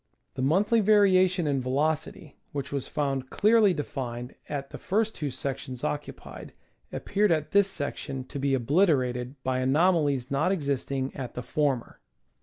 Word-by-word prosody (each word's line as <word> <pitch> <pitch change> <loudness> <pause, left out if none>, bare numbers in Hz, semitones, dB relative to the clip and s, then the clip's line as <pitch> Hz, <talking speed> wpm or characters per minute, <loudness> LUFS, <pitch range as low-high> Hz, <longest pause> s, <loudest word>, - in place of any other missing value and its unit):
The 130 - -4
monthly 195 - +3
variation 190 -4 +4
in 140 -3 0
velocity, 150 +4 -2 0.2
which 140 -2 -4
was 140 -2 -3
found 135 -3 -2
clearly 215 -1 +4
de 150 -4 -2
fined 125 -2 -6 0.2
at 140 -2 -4
the - - -8
first 220 +3 0
two 150 -3 -3
sections 130 -1 -5
occupied, 75 -1 -5 0.4
appeared 205 -1 0
at 155 -2 0
this 200 -1 +5
section 145 -4 -4
to 140 +2 -7
be 135 0 +1
obliterated 130 -3 +1
by 130 0 0
anomalies 145 -2 +2
not 150 +6 +2
existing 140 -5 -2
at 130 -3 -6
the 125 - -4
former. 135 -1 -1
140 Hz, 150 wpm, -27 LUFS, 130-180 Hz, 0.4 s, this